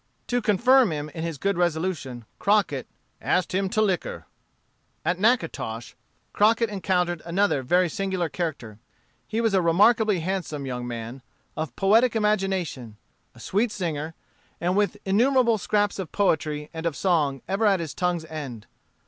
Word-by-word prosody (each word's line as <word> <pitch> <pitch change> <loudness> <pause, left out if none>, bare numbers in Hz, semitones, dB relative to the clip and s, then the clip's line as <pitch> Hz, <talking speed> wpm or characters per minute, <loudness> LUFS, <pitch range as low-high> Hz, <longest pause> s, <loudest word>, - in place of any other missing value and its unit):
'" - - -44
To 245 - +2
confirm 235 +2 +4
him 150 0 -4
in 160 - -7
his 165 -3 -3
good 195 +3 -1
resolution, 160 -8 -1
Crockett 200 - +1 0.3
"asked 180 -1 0
him 190 +1 0
to 215 +3 +2
liquor." 190 -5 -2 0.8
At 175 +2 0
Natchitoches, 165 - 0 0.4
Crockett 225 +1 +3
encountered 180 -4 0
another 175 -3 +1
very 180 +8 +2
singular 190 0 -2
character. 140 - -5 0.5
He 225 +1 -1
was 225 -3 +1
a 190 - +4
remarkably 205 +3 +4
handsome 165 -5 -3
young 125 -2 -4
man, 120 +2 -6 0.3
of 155 0 -4
poetic 225 +5 +3
imagination, 190 - -1 0.4
a - - -15
sweet 215 +4 0
singer, 165 -5 -3 0.4
and 180 +2 0
with 210 +1 +1
innumerable 235 +3 +3
scraps 205 0 0
of 185 -5 -5
poetry 155 -6 0
and 160 +1 -3
of 160 - -2
song 145 -6 +1
ever 200 +3 +1
at 195 -2 +3
his 165 -3 -5
tongue's 175 -2 -1
end. 140 -9 -7
180 Hz, 150 wpm, -25 LUFS, 155-205 Hz, 0.8 s, confirm